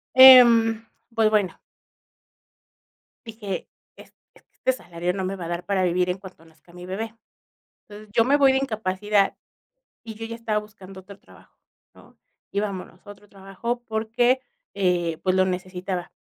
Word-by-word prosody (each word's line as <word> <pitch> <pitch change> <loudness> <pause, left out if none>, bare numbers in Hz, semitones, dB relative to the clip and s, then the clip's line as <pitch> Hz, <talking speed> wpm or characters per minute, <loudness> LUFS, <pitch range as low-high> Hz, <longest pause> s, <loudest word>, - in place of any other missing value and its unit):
Em, 235 -4 +8 0.3
pues 220 -1 +3
bueno 205 -4 0 1.7
dije: 215 -4 -6 0.3
"Es - - -16 0.2
es - - -22
que - - -60 0.2
este 260 - -5
salario 175 +1 -3
no 190 -1 -3
me 195 +1 -3
va 175 -2 -7
a - - -6
dar 175 +1 -4
para 190 -1 0
vivir 180 +1 +1
en 180 - -3
cuanto 185 -4 -14
nazca 160 +1 -23
mi 180 0 -11
bebé". 220 +4 -5 0.7
Entonces, 210 0 -12
yo 230 - +4
me 280 +3 +3
voy 275 -2 +5
de 265 - +2
incapacidad 210 -4 0 0.7
y 220 -1 -8
yo 225 +1 -8
ya 230 0 -7
estaba 220 -2 -1
buscando 195 -2 -11
otro 200 +1 -14
trabajo, - - -21 0.4
¿no? - - -20 0.4
Y 200 - 0
vámonos 200 -1 -6
a - - -10
otro 205 0 -15
trabajo 200 +5 -5
porque, 235 +4 0 0.3
eh, 175 -4 0
pues 185 -1 +1
lo 185 - +4
necesitaba. 180 0 -4
200 Hz, 165 wpm, -23 LUFS, 185-225 Hz, 1.7 s, Em